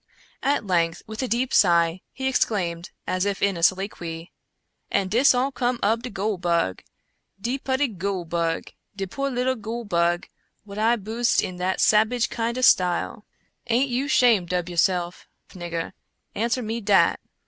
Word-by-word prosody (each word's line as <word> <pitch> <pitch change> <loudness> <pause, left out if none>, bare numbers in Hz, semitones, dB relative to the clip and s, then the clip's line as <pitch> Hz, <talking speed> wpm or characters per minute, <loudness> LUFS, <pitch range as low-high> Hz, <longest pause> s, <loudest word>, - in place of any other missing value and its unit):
At 280 -4 0
length, 170 -3 0
with 220 +2 -6
a 260 - -1
deep 245 +3 -1
sigh, 170 -1 +4
he 265 0 -3
exclaimed, 180 -9 -1 0.2
as 185 0 -1
if 200 -1 -1
in 200 -1 +1
a 170 - -5
soliloquy: 175 -2 -1 0.3
" - - -49
And 195 -2 0
dis 250 +4 +5
all 260 +3 +1
cum 245 -2 -1
ob 225 +2 +2
de 250 - -6
goole 200 -1 -2
bug! 170 - 0 0.6
de 245 +6 -2
putty 265 +2 0
goole 195 -4 -3
bug! 165 0 -2 0.2
de 195 -1 -3
poor 275 +9 -3
little 255 0 0
goole 230 0 -6
bug, 175 -2 +1 0.4
what 200 0 -8
I 225 +2 +3
boosed 230 +3 0
in 180 - -5
that 185 +1 -1
sabage 220 +3 +3
kind 230 +1 -2
ob 255 - -2
style! 185 +1 +2 0.4
Aint 250 +3 +1
you 260 +3 -1
shamed 225 - +3
ob 180 0 -2
yourself, 175 0 0 0.2
nigger? 170 -1 -5 0.2
— - - -52
answer 235 +3 -1
me 225 +2 -3
dat 200 -2 +3
205 Hz, 170 wpm, -24 LUFS, 175-240 Hz, 0.6 s, dis